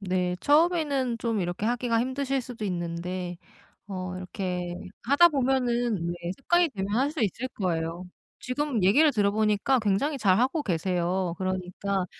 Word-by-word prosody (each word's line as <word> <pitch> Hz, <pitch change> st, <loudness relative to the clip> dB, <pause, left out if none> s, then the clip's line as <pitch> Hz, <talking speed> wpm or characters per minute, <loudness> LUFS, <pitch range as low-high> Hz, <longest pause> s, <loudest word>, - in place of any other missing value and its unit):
네. 180 Hz, -2 st, -1 dB
처음에는 295 Hz, -5 st, +2 dB
좀 230 Hz, -3 st, -1 dB
이렇게 175 Hz, +3 st, -3 dB
하기가 235 Hz, -1 st, +1 dB
힘드실 265 Hz, +2 st, -1 dB
수도 240 Hz, -3 st, -7 dB
있는데 175 Hz, 0 st, -3 dB, 0.5 s
어 185 Hz, -2 st, -5 dB
이렇게 180 Hz, -1 st, -4 dB, 0.3 s
하다 285 Hz, +8 st, +6 dB
보면은 245 Hz, -, 0 dB
왜 175 Hz, 0 st, -4 dB
습관이 345 Hz, +4 st, +2 dB
되면 205 Hz, -3 st, -3 dB
할 275 Hz, +4 st, +2 dB
수 310 Hz, -, -4 dB
있을 225 Hz, +4 st, -1 dB
거예요. 170 Hz, -3 st, -2 dB, 0.3 s
지금 255 Hz, -4 st, -1 dB
얘기를 290 Hz, +12 st, +5 dB
들어 205 Hz, -5 st, +2 dB
보니까 215 Hz, +5 st, +2 dB
굉장히 220 Hz, +8 st, 0 dB
잘 190 Hz, -6 st, +3 dB
하고 265 Hz, +6 st, +1 dB
계세요. 180 Hz, -, -1 dB
그러니까 185 Hz, +1 st, -2 dB
210 Hz, 320 characters per minute, -27 LUFS, 185-260 Hz, 0.5 s, 하다